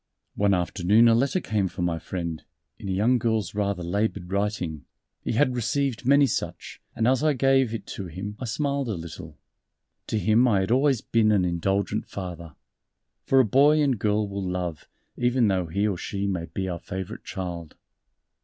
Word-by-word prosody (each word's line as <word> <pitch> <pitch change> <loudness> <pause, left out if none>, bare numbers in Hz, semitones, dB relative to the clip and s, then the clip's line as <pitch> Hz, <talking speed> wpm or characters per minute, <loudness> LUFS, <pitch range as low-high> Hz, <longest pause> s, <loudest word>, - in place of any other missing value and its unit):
One 100 -1 +2
afternoon 95 +5 +3
a 115 - +6
letter 135 +10 +2
came 105 - -1
for 90 0 -5
my 85 -2 0
friend 85 -2 -5 0.4
in 100 - -6
a - - 0
young 115 +7 +2
girl's 110 -5 -1
rather 100 -3 -1
labored 95 0 -2
writing 100 -7 -2 0.4
he - - -2
had 130 +2 +2
received 125 +1 -1
many 140 +1 +6
such, 130 - -4
and 115 - +1
as 130 +2 +2
I 155 -1 +3
gave 135 -2 +3
it 110 -3 -5
to 95 - -5
him 95 +5 -6
I 130 - -4
smiled 140 +2 -1
a 110 - -1
little. 80 -2 -9 0.7
To 110 - -1
him 110 +5 +3
I 100 -5 +3
had 95 - -2
always 135 -1 +3
been 110 -2 +2
an 100 -4 +3
indulgent 95 +4 -1
Father 85 -5 -7 0.7
for 135 - +5
a 130 - +5
boy 145 +7 +4
and 135 -7 +2
girl 105 0 +1
will 100 0 -4
love, 90 -4 -4 0.3
even 120 -2 +2
though 95 -3 0
he 100 +6 0
or 100 -4 0
she 100 0 -3
may 90 -4 -2
be 95 +2 -4
our 85 -2 -3
favorite 95 +4 -6
child. 85 -5 -6
105 Hz, 185 wpm, -25 LUFS, 90-120 Hz, 0.7 s, a